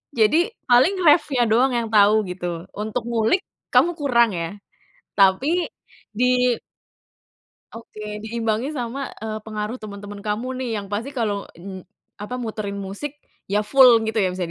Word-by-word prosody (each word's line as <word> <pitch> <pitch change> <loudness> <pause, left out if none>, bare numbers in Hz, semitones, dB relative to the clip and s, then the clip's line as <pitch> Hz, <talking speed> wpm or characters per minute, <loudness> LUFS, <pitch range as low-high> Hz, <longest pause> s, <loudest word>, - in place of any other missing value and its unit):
Jadi 225 +7 +4 0.3
paling 250 +10 +5
reffnya 295 -5 +4
doang 250 +4 +3
yang 235 -1 0
tahu 205 -1 +6 0.2
gitu 175 -2 -5
untuk 220 +3 -3
ngulik 230 - +2 0.3
kamu 345 - +5
kurang 240 -5 +3
ya, 165 -2 -3 0.7
tapi 265 - +3 0.5
di 250 +1 +3 1.2
Oke, 230 -2 -11 0.2
diimbangi 225 +2 -1
sama, 245 0 -4 0.2
eee, 215 -1 -4
pengaruh 215 +3 -4
teman-teman 205 -1 -8
kamu 210 +4 -3
nih 255 - -3
yang 205 -1 -4
pasti 225 +7 -2
kalau, 210 -5 -2
mmm, 190 +2 -8 0.4
apa 210 +5 -5
muterin 215 -4 -4
musik 205 +10 -5 0.4
ya 205 +2 +1
full 245 -1 +6
gitu 220 0 -1
ya - - +3
bisa 185 - -2
220 Hz, 140 wpm, -22 LUFS, 205-250 Hz, 1.2 s, tahu